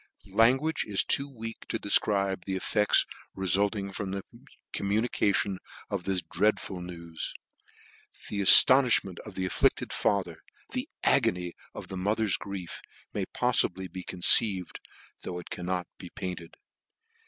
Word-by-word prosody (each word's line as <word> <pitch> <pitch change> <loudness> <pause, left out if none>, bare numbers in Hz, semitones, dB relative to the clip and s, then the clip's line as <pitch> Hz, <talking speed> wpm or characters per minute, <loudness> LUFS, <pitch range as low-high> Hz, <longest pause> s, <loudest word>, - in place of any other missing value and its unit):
Language 130 +8 +3
is 100 -2 0
too 140 +1 0
weak 115 -3 -9
to - - -2
defcribe 100 -3 +1
the 95 - -3
effects 105 +2 +2 0.3
refulting 100 +2 0
from 95 0 -4
the 95 0 -4 0.5
communication 100 -2 0 0.3
of 95 -3 -3
this 95 -2 -1
dreadful 105 -3 -1
news: 85 -2 -7 0.9
the 100 - -4
aftonifhment 120 -3 +7
of 105 -4 -11
the 95 - -2
afflicted 95 - 0
father, 90 -5 -1 0.3
the - - -4
agony 90 -1 +1 0.2
of - - -9
the 95 - -6
mother's 105 +2 0
grief, 95 -4 -7 0.3
may - - -3
poffibly 95 0 0
be 95 - -6
con 90 0 -8
ceived, 95 -2 +4 0.4
though 90 - -6
it 90 - -10
cannot 90 0 -3
be 90 - -9
painttd. 90 -3 -7
95 Hz, 130 wpm, -28 LUFS, 90-105 Hz, 0.9 s, aftonifhment